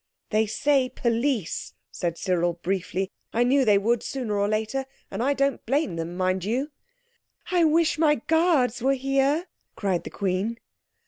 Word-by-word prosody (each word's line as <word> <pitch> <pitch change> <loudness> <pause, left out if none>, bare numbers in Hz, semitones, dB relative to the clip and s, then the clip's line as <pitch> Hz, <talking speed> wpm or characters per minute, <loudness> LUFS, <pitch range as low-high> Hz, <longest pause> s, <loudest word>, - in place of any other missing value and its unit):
"They 215 0 +2
say 270 +3 +2
'Police!'," 235 - -1 0.2
said 170 -1 -3
Cyril 175 -2 +1
briefly. 190 +2 -2 0.2
"I 235 - +3
knew 265 +3 +3
they 210 -4 +5
would 225 +3 +1
sooner 245 -6 -3
or 200 0 +1
later. 220 +5 -1 0.2
And 195 - -3
I 280 +3 +2
don't 275 -1 0
blame 280 - +1
them, 165 +2 -5
mind 185 0 0
you." 255 +9 -1 0.8
"I 350 -2 +4
wish 315 0 +2
my 305 -2 +4
guards 300 -4 +2
were 270 +2 +3
here!" 275 +5 +1 0.3
cried 190 -4 -1
the - - -6
Queen. 195 +4 -1
235 Hz, 155 wpm, -25 LUFS, 195-275 Hz, 0.8 s, they